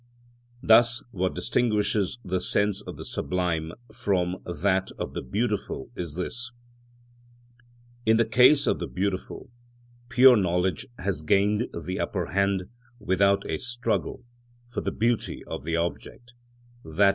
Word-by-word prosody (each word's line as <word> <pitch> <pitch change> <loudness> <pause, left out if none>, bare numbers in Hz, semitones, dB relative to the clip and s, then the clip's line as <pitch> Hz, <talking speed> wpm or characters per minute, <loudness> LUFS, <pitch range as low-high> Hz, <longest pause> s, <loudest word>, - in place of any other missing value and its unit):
Thus 115 +1 +5
what 95 -2 -1
distinguishes 105 -2 0
the 95 0 -1
sense 100 +2 +1
of - - -9
the - - -8
sublime 85 -3 -2 0.2
from 90 -4 0
that 95 +3 0
of - - -5
the - - -3
beautiful 105 - -3
is 85 -4 -5
this: 120 +6 -4 1.5
in 110 0 +4
the 115 - +3
case 130 +6 +5
of - - +1
the - - -3
beautiful, 95 +4 -4 0.6
pure 125 0 +7
knowledge 90 -2 0
has 90 -5 -2
gained 100 +8 +2
the 90 +3 -4
upper - - -2
hand 100 0 +1 0.3
without 100 -1 +2
a - - -2
struggle, 125 +1 -2 0.4
for 120 +1 -5
the - - -2
beauty 115 +1 -1
of 65 - -6
the 85 0 -1
object, 85 +8 -4 0.5
_i. 90 +6 +3
100 Hz, 135 wpm, -26 LUFS, 90-115 Hz, 1.5 s, pure